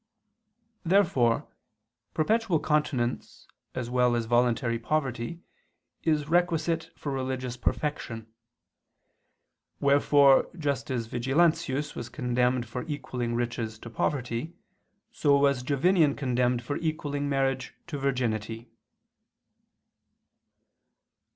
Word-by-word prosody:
Therefore 165 - +3 0.7
perpetual 215 +1 +2
continence, 150 -5 -1 0.3
as 130 -2 -3
well 125 0 +2
as 115 -1 -1
voluntary 120 0 +2
poverty, 135 +3 -2 0.6
is 150 -3 +1
requisite 165 -1 +1
for 145 - -4
religious 130 -2 -3
perfection. 125 -4 -2 1.5
Wherefore 140 -1 +5
just 140 -3 -2
as 120 -3 -1
Vigilantius 145 +3 +1
was 120 - -6
condemned 125 -2 0
for 125 +2 -4
equaling 125 -5 -3
riches 115 -2 -2
to 120 +1 -10
poverty, 125 +6 -2 0.6
so 145 -11 +3
was 140 -2 +3
Jovinian 145 +3 +3
condemned 125 -2 +1
for 145 +5 -3
equaling 145 -3 -2
marriage 135 -1 -1
to 150 -5 -5
virginity. 115 -4 -2
135 Hz, 95 wpm, -28 LUFS, 120-150 Hz, 1.5 s, Wherefore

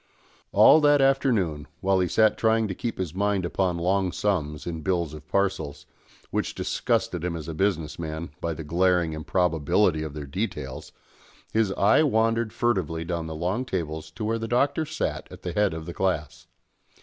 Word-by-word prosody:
All 155 - +7
that 145 -1 +5
afternoon, 115 - +2
while 95 -1 +2
he 90 - +2
sat 110 +3 +3
trying 110 -1 +2
to 95 - -3
keep 115 +5 -4
his 90 -4 -3
mind 100 -1 0
upon 90 0 0
long 95 +2 +1
sums 75 -8 -1
in 80 -2 -4
Bills 85 -2 -1
of 75 0 -11
Parcels, 95 -8 -1 0.5
which - - -2
disgusted 115 -7 -1
him 90 -1 -2
as 80 -3 -6
a 80 - -4
business 85 -3 -1
man, 80 -1 -5
by 85 -1 -2
the 80 - -6
glaring 85 +1 +2
improbability 80 +1 +1
of 75 -2 -5
their 75 -2 -5
details, 70 - -5 0.6
his 110 -3 +2
eye 100 +9 +4
wandered 115 -5 +2
furtively 90 -10 -1
down 85 -1 -3
the 80 - -5
long 90 +10 -1
tables 80 -8 -4
to 105 +7 -6
where 115 +1 0
the 115 - -3
Doctor 140 +7 +1
sat 155 - -3
at - - -12
the 90 - -3
head 105 0 +2
of 80 0 -6
the 85 - -6
class. 85 -7 -2
90 Hz, 180 wpm, -26 LUFS, 80-110 Hz, 0.6 s, All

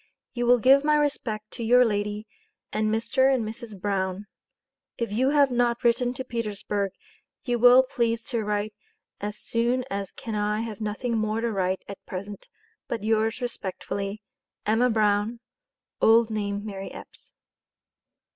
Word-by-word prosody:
you 240 -1 -1
will 245 +1 +7
give 270 +4 +5
my 300 0 +3
Respect 235 -8 -1
to 235 - -6
your 245 +2 +6
lady, 210 -1 -2 0.3
& - - -30
Mr 230 +5 +2
& - - -2
Mrs 220 -1 -7
Brown. 190 0 -2 0.7
If 235 -3 -2
you 255 +6 +2
have 285 -2 +4
not 240 -1 +1
written 245 +1 +3
to 260 - -4
Petersburg 210 -4 -3 0.5
you 240 -2 -1
will 245 +2 +8
please 230 -3 -1
to 235 -3 -2
write 210 0 -1 0.5
as 210 +1 -4
soon 240 +3 0
as 200 -1 -3
can 225 - -7
I 210 +1 0
have 225 -1 -6
nothing 215 +3 -2
More 215 +1 0
to 235 0 -1
Write 190 -2 -1
at 200 - -9
present 200 +2 -7 0.4
but 230 -3 -3
yours 220 +2 +1
Respectfully 200 -2 -4 0.4
EMMA 225 +4 +3
BROWN 215 +1 +1 0.6
(old 225 0 +5
name 205 -1 -2
MARY 195 -2 -6
EPPS). - - -13
220 Hz, 150 wpm, -26 LUFS, 205-240 Hz, 0.7 s, will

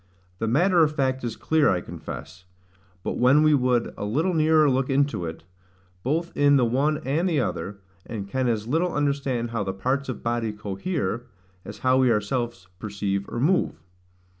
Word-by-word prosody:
The 115 - -1
matter 175 - +4
of 150 0 0
fact 130 -2 0
is 120 -2 -3
clear, 160 -2 +2
I 95 - +2
confess; 90 +1 -9 0.6
but - - -3
when 130 +5 +5
we 155 0 +5
would 125 -3 +1
a - - -6
little 155 - 0
nearer 155 -1 +4
look 130 -1 +1
into 140 -9 +1
it, 80 0 -7 0.6
both 165 - -2
in 145 0 +5
the 130 -3 +4
one 140 +6 +1
and 160 +8 +1
the 160 -4 +1
other; 100 0 -3 0.3
and 105 -4 -5
can 130 +4 -1
as 110 -3 0
little 165 +7 0
understand 140 -5 -1
how 115 -3 -1
the 95 -1 -3
parts 130 +7 -1
of 125 - -5
body 115 -2 -1
cohere, 105 - -3 0.4
as - - -9
how 130 0 +5
we 130 -2 +4
ourselves 115 -1 -2
perceive 100 -2 -3
or 120 - -4
move. 175 +8 +1
130 Hz, 180 wpm, -25 LUFS, 110-145 Hz, 0.6 s, when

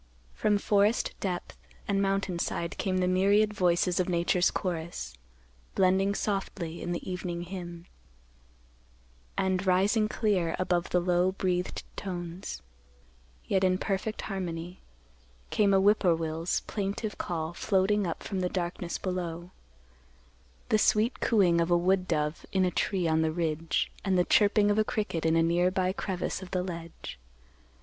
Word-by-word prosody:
From 210 -1 +2
forest 205 +2 +2
depth 180 -3 -4 0.3
and 200 -1 +1
mountain 195 -2 0
side 170 0 -2
came 185 -1 0
the 180 0 +1
myriad 200 +3 +3
voices 180 -2 +2
of 185 - +1
Nature's 175 +1 +2
chorus, 170 - -4 0.6
blending 190 +1 +3
softly 190 -5 -3
in 175 - -3
the 175 - -4
evening 180 -2 -4
hymn; 175 -2 -7 1.5
and, 190 0 +1
rising 200 +4 +3
clear 190 -8 0
above 180 -1 0
the 180 - +2
low 180 +1 +2
breathed 180 -2 -2
tones, 175 - -6 0.8
yet 190 -1 +1
in 185 0 +3
perfect 200 +3 -2
harmony, 180 -2 -5 0.7
came 205 -2 +3
a 195 - +5
whip 205 +2 +4
poor 175 -4 +3
will's 165 +1 -2
plaintive 205 +1 -4
call 165 -1 -3
floating 195 +1 +1
up 165 - -4
from 195 -2 -3
the 180 -1 0
darkness 175 -1 -3
below; 175 -1 -4 1.2
the 215 - +3
sweet 215 +4 +2
cooing 180 -7 +3
of 165 - 0
a 175 - +5
wood 185 +1 +1
dove 150 -2 -1
in 190 -1 +2
a 180 - +1
tree 185 -3 0
on 160 0 +2
the 160 0 +1
ridge, 160 -1 -1
and 190 -2 +1
the 180 - +3
chirping 205 0 +4
of 205 - +2
a - - +5
cricket 205 -8 -2
in 160 - +3
a 165 - +4
nearby 180 +2 +2
crevice 190 -2 -3
of 185 - -9
the 180 -1 -1
ledge. 165 - -7
185 Hz, 150 wpm, -29 LUFS, 170-195 Hz, 1.5 s, a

